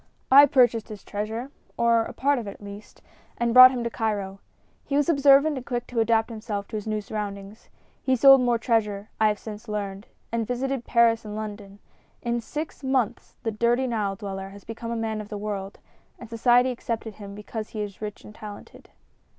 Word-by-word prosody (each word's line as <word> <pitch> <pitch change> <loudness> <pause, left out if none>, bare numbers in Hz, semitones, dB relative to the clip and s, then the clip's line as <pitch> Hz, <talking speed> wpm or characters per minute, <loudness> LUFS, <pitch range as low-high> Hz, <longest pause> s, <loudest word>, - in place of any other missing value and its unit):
I 285 +2 +9
purchased 240 -5 +3
his 210 -2 -9
treasure 220 +6 -5 0.3
or 230 -1 +3
a - - -7
part 280 0 +1
of 225 - -7
it, 200 - -6
at - - -17
least 205 +1 -11 0.3
and 235 -1 0
brought 255 +1 +11
him 250 -2 -3
to 235 - -1
Cairo. 200 -4 -3 0.4
He 280 - -3
was 290 - +2
observant 280 0 +5
and 255 - -6
quick 245 -2 -3
to 240 - -3
adapt 225 0 +2
himself 215 -3 -5
to 225 - -6
his 210 0 -5
new 215 -1 -1
surroundings. 205 0 -7 0.3
He 260 - +2
sold 270 +1 +7
more 245 -1 +2
treasure, 215 -3 -1
I 215 - +6
have 210 0 +1
since 215 +2 -9
learned, 200 -1 -5 0.2
and 230 -1 -1
visited 255 0 -2
Paris 230 -1 +3
and 210 -1 -7
London. 205 -2 -7 0.5
In 235 0 -1
six 300 +5 -6
months 260 -4 -1
the 225 - -1
dirty 235 +4 +1
Nile 215 -5 -1
dweller 195 -1 -6
has 200 0 -13
become 230 +1 -7
a 235 - -2
man 220 -1 -2
of 210 - -11
the 210 - -5
world, 200 -1 -5 0.4
and 235 - -10
society 245 +3 +3
accepted 230 -2 -4
him 200 -1 -9
because 215 +1 -6
he 215 - -5
is 205 -1 -9
rich 210 -1 -6
and 210 - -12
talented." 210 -1 -11
225 Hz, 200 wpm, -25 LUFS, 210-245 Hz, 0.5 s, brought